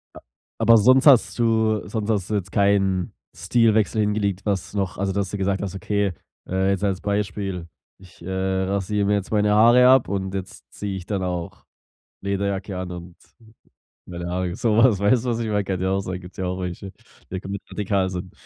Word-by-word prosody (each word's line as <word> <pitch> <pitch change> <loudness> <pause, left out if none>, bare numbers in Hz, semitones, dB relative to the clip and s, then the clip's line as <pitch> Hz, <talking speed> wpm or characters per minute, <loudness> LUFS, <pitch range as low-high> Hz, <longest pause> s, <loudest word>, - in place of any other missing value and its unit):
A - - -9 0.4
aber 115 0 +6
sonst 130 +5 +5
hast 135 -6 +5
du 110 -2 +1
sonst 105 0 -3
hast 100 -5 0
du 110 - 0
jetzt 100 -4 -3
keinen 95 -3 +1 0.2
Stilwechsel 110 +4 +2
hingelegt, 105 -2 -1
was 100 -3 -2
noch 95 -2 -2
Also, 100 0 -1
dass 100 -1 -1
du 105 - -4
gesagt 95 0 -1
hast, 100 -1 -4
okay, 100 0 -1 0.3
äh, 95 +1 0
jetzt 100 0 -2
als 95 -3 0
Beispiel: 100 -3 -3 0.3
„Ich, 95 -2 -18
äh, 90 - -7
rasiere 95 +2 -1
mir 105 - +2
jetzt 100 -1 -3
meine 105 -1 +2
Haare 120 +4 +6
ab 130 -1 +5
und 95 -1 -3
jetzt 95 -1 -7
ziehe 100 -2 -5
ich 90 - -8
dann 95 0 -2
auch 90 -2 -5 0.6
Lederjacke 100 0 -2
an 90 -1 -5
und 90 0 -9 0.9
meine 85 -1 -6
Haare.” 90 0 -2
Sowas, 115 -1 +3
weißt 110 +4 +2
du, - - 0
was 115 -1 -1
ich 115 - -2
meine? 105 -1 0
Kann 95 -1 -3
ja 95 - 0
auch 95 - +1
sein, 90 -1 -5
gibt's 90 0 -13
ja 95 - -2
auch 90 +1 -3
welche, 90 +2 -6
die - - -35 0.3
da 95 - -4
komplett 100 +1 -7
radikal 100 -2 0
sind. 90 -1 -6
100 Hz, 200 wpm, -23 LUFS, 95-105 Hz, 0.9 s, aber